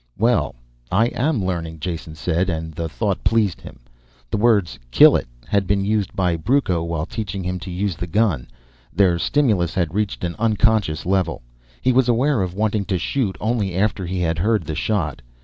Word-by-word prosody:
"Well... 115 - +1 0.4
I 110 +6 +3
am 125 -6 0
learning," 85 -3 -3
Jason 80 -1 -5
said, 90 +3 0
and 80 -2 -3
the 85 +1 -4
thought 100 +3 -2
pleased 110 -6 +1
him. 65 - -12 0.5
The - - 0
words 105 - +2
kill - - +7
it - - -1 0.2
had 100 +6 0
been 100 0 +1
used 105 -3 0
by 90 -4 +1
Brucco 95 - +1
while 85 -2 -2
teaching 100 -2 -5
him 90 +1 -3
to 95 +1 -8
use 90 0 -2
the 90 +3 -5
gun. 90 - +1 0.4
Their 90 -4 +3
stimulus 105 - +1
had 85 -4 0
reached 105 -2 -2
an 85 -1 -2
unconscious 110 -7 +1
level. 90 -6 0 0.4
He 130 - +2
was 130 0 +3
aware 125 +1 +2
of 90 -1 -3
wanting 105 -1 0
to 95 -2 0
shoot 100 +2 -1
only 105 -5 -1
after 100 0 0
he 90 0 -2
had 80 -2 0
heard 105 +1 +2
the 80 - -5
shot. 85 -1 -1
95 Hz, 185 wpm, -21 LUFS, 85-110 Hz, 0.5 s, kill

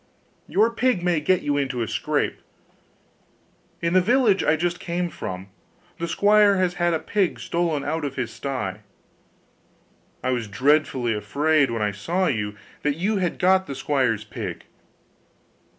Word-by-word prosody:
Your 220 +4 +3
pig 240 -5 +1
may 175 -3 +2
get 185 +4 +1
you 145 0 0
into 135 -4 -1
a - - -4
scrape. - - -1 1.4
In 170 +1 +1
the 185 - +6
village 225 -1 +3
I 150 - +3
just 175 +2 -1
came 175 0 -2
from, 95 0 -6 0.5
the 170 - -2
squire 205 +2 +4
has 185 -1 +1
had 175 -1 +1
a - - -1
pig 195 0 0
stolen 170 -4 -1
out 160 +2 -2
of 140 -2 -3
his 120 -4 -3
sty. 110 -6 -4 1.4
I 130 - +1
was 120 -3 -1
dreadfully 130 +1 +2
afraid 145 +6 +2
when 115 -2 -1
I 105 - +1
saw 170 - -1
you 105 - -1 0.3
that 145 0 0
you 205 +5 0
had 180 -3 -1
got 190 +1 +3
the 140 - -5
squire's 130 -6 0
pig. 105 - -6
155 Hz, 155 wpm, -24 LUFS, 125-185 Hz, 1.4 s, the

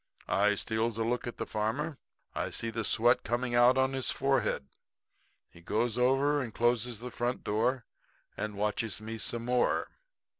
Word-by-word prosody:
"'I 105 +1 +3
steals 110 +2 -1
a 115 - 0
look 120 +2 -1
at 120 - -6
the - - -3
farmer 110 +6 -1
man. 150 -3 -6 0.4
I - - -2
see 115 - -1
the 115 0 -2
sweat 120 +4 +4
coming 120 +1 -1
out 120 +2 +6
on 130 0 +2
his 130 -1 -1
forehead. 135 - 0 0.8
He 85 - -17
goes 110 +5 0
over 135 +4 +3
and 120 -4 -4
closes 120 0 +1
the 125 0 -6
front 120 +1 -2
door 115 +3 0 0.5
and 105 -1 -4
watches 105 +1 -1
me 110 +1 -6
some 115 +2 -2
more. 125 0 +1
120 Hz, 175 wpm, -30 LUFS, 110-125 Hz, 0.8 s, out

